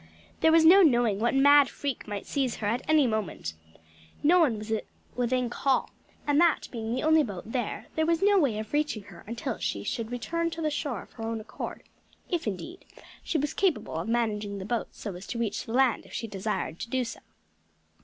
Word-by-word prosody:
There 320 - +5
was 325 0 +6
no 375 +5 +9
knowing 240 - +4
what 235 +4 +1
mad 285 0 +6
freak 280 -6 -4
might 205 -1 -5
seize 265 -5 -1
her 215 - -5
at 230 +4 0
any 310 -3 +5
moment; 215 - -2 0.7
no 345 +5 +6
one 275 -10 +3
was 215 +1 -4 0.4
within 250 0 +1
call, 265 +2 0 0.3
and 290 +2 +3
that 340 -2 +3
being 225 -2 -4
the 255 - -2
only 315 0 +5
boat 210 -4 -5
there, 245 -4 -3
there 315 0 +1
was 335 +2 +2
no 405 -1 +5
way 265 -10 +1
of 215 +3 -6
reaching 295 -8 0
her 175 -4 -13
until 235 +2 -4
she 100 - -2
should 225 - -3
return 335 +8 -1
to 330 0 -6
the 305 - +1
shore 270 -7 -3
of - - -20
her 225 - -9
own 225 0 -2
accord; 215 - -7 0.5
if 340 -8 -1
indeed, 330 - -5 0.4
she 325 - -1
was 295 0 -1
capable 335 - 0
of 165 +7 -3
managing 210 -3 -1
the 190 - -6
boat 235 +2 -1
so 205 - -7
as 180 +2 -9
to 240 - -4
reach 230 -3 -2
the 225 - -5
land 260 -2 +3
if - - -15
she - - -3
desired 200 -5 -3
to - - -5
do 260 0 0
so. 230 - -7
240 Hz, 215 wpm, -28 LUFS, 215-300 Hz, 0.7 s, no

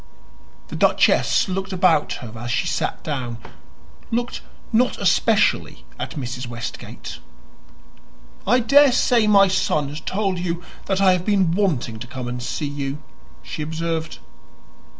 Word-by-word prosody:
The - - -6
duchess - - +3
looked 190 +1 -3
about 180 -5 +3
her 110 -3 -8
as 120 +2 -6
she 125 - 0
sat - - -2
down 125 -6 -3 0.7
looked 240 +1 -2 0.3
not 245 +3 +3
especially - - +2
at - - -5
Mrs. 125 -3 -5
Westgate. 120 0 -7 1.3
"I 250 0 +4
daresay 255 -3 +5
my 200 -2 +6
son 155 -6 0
has 150 +2 -7
told 195 -2 -1
you 175 0 -3 0.2
that 195 0 +1
I 190 -1 +6
have 180 -1 +1
been 195 -4 +2
wanting 160 - 0
to 120 - -7
come 125 0 -6
and 125 0 -4
see 120 +5 -3
you," 140 -1 -3 0.5
she - - -6
observed. 160 - -3
165 Hz, 135 wpm, -22 LUFS, 130-195 Hz, 1.3 s, my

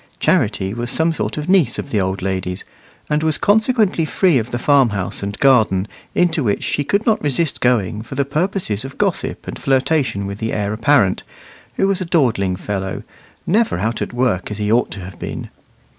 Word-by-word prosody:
Charity 95 +1 +1
was 120 +1 -4
some 160 +5 +1
sort - - -3
of 150 +1 -4
niece 180 -10 +3
of 140 - -6
the 105 - +1
old 95 0 -2
lady's, 95 -1 -3 0.4
and 150 0 0
was 160 -1 +1
consequently 215 -4 +2
free 160 -2 +2
of 115 +1 -4
the 120 - -2
farmhouse 120 -8 +1
and 100 +1 -4
garden, 110 -8 +3 0.3
into 170 -4 +2
which 105 -4 0
she 145 - 0
could 200 +9 0
not 220 -2 +2
resist 145 +1 0
going 110 -5 +1
for 120 +4 -8
the 140 +1 +1
purposes 150 - -1
of 135 +1 -9
gossip - - -1
and - - -6
flirtation 130 -6 +1
with 100 +1 -6
the 110 0 -2
heir 105 0 -1
apparent, 110 -4 +3 0.5
who 195 - +2
was 195 -1 0
a - - -2
dawdling 120 - +1
fellow, 95 0 -4 0.4
never 215 - +2
out 110 +5 -2
at - - -3
work 120 -7 0
as 105 - -5
he 105 0 -1
ought 120 +2 +3
to 100 - -7
have 90 -1 -10
been. - - -6
125 Hz, 195 wpm, -19 LUFS, 100-160 Hz, 0.5 s, niece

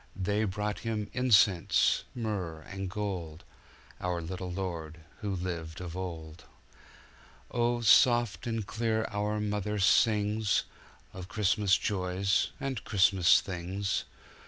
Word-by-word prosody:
They 105 +3 0
brought 105 -1 -3
Him 105 0 -3
incense, 110 -8 +3
myrrh, 100 -9 -3
and 95 +4 -6
gold, 90 -6 -4 0.6
Our 90 -1 -2
little 90 +2 -5
Lord 85 -4 -5 0.2
who 105 -4 -3
lived 85 -3 -5
of 90 -2 -6
old. 85 -3 -7 1.1
Oh, 120 0 +1
soft 120 0 +4
and 115 -3 -2
clear 110 +1 -1
our 105 +1 -1
mother 105 0 -2
singsOf 105 +1 +3 0.6
Christmas 105 -1 +2
joys 95 0 0
and 135 -5 -3
Christmas 95 -3 +4
things. 95 +2 -3
100 Hz, 110 wpm, -30 LUFS, 90-105 Hz, 1.1 s, soft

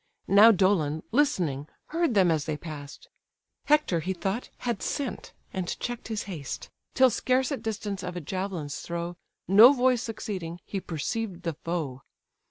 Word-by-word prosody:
Now 205 +4 +8
Dolon, 175 -6 +2
listening, 180 - +1 0.2
heard 330 -6 +1
them 185 -4 +5
as 155 -3 0
they 155 -2 -2
pass'd; 145 -3 -9 0.6
Hector 300 - +3
(he 185 +4 -2
thought) 195 +6 -3
had 235 -5 -2
sent, 280 -5 -3 0.2
and 185 -2 -3
check'd 240 -1 -4
his 220 -2 -3
haste, 160 -9 -6 0.2
Till 260 -1 +6
scarce 255 +5 +1
at 275 - -3
distance 210 -3 -3
of 180 -1 -5
a - - -2
javelin's 175 -3 -4
throw, 170 +1 -4 0.3
No 220 +8 +9
voice 255 -2 +3
succeeding, 190 -7 -5
he 195 - -3
perceived 180 +4 -3
the 165 - -1
foe. 150 -5 -4
190 Hz, 155 wpm, -27 LUFS, 165-230 Hz, 0.6 s, No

